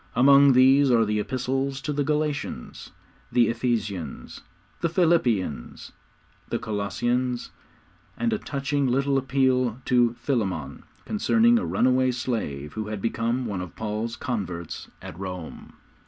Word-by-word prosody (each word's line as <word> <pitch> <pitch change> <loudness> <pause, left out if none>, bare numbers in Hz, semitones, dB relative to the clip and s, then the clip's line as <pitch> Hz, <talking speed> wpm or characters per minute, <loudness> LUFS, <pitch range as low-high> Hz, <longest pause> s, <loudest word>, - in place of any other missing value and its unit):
Among 140 +2 +7
these 135 +2 +5
are 115 -2 +4
the 105 0 0
Epistles 135 +4 -2
to 150 - -3
the 145 0 0
Galatians, 150 - -3 0.4
the 120 -1 +4
Ephesians, 110 - -3 0.4
the 170 - 0
Philippians, 125 - 0 0.6
the - - 0
Colossians, 120 +5 -2 0.7
and 235 -1 0
a 215 - -1
touching 140 -3 -1
little 135 +2 +2
appeal 130 -2 +1
to 120 -2 +3
Philemon 95 - -3 0.2
concerning 230 +2 +3
a - - -3
runaway 130 +1 +2
slave 110 - -3
who 110 -1 -4
had 105 -1 -4
become 115 +3 -1
one 100 -5 -3
of 90 - -8
Paul's 110 +2 -3
converts 90 -10 -4 0.2
at 85 - -9
Rome. 90 -4 -7
125 Hz, 125 wpm, -25 LUFS, 105-135 Hz, 0.7 s, Among